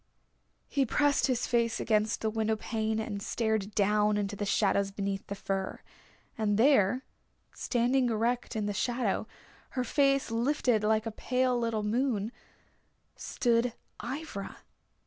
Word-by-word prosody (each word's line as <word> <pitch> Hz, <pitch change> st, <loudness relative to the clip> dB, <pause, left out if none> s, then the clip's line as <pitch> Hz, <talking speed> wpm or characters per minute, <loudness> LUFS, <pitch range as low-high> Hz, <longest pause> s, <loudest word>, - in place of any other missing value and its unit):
He 280 Hz, -, +1 dB
pressed 290 Hz, +3 st, +2 dB
his 255 Hz, -3 st, 0 dB
face 235 Hz, -1 st, +1 dB
against 215 Hz, 0 st, +1 dB
the 220 Hz, -, 0 dB
window 220 Hz, 0 st, 0 dB
pane 220 Hz, 0 st, -2 dB
and 210 Hz, -2 st, -4 dB
stared 220 Hz, -2 st, -1 dB
down 210 Hz, +1 st, +3 dB
into 205 Hz, 0 st, -2 dB
the 205 Hz, 0 st, -3 dB
shadows 200 Hz, -1 st, +2 dB
beneath 195 Hz, 0 st, -4 dB
the 200 Hz, -, -4 dB
fir. 195 Hz, -1 st, -3 dB, 0.6 s
And 205 Hz, -2 st, +1 dB
there, 250 Hz, -1 st, +4 dB, 0.5 s
standing 245 Hz, +1 st, +1 dB
erect 235 Hz, +2 st, -1 dB
in 215 Hz, -1 st, -1 dB
the 205 Hz, -, -1 dB
shadow, 235 Hz, -1 st, -1 dB, 0.5 s
her 255 Hz, -, +2 dB
face 275 Hz, 0 st, +2 dB
lifted 235 Hz, -2 st, +1 dB
like 220 Hz, +1 st, +2 dB
a 225 Hz, -, -3 dB
pale 255 Hz, +3 st, 0 dB
little 230 Hz, -3 st, -1 dB
moon, 225 Hz, -1 st, 0 dB, 0.8 s
stood 235 Hz, -1 st, 0 dB, 0.3 s
Ivra. 260 Hz, -5 st, -5 dB
220 Hz, 135 wpm, -30 LUFS, 210-245 Hz, 0.8 s, there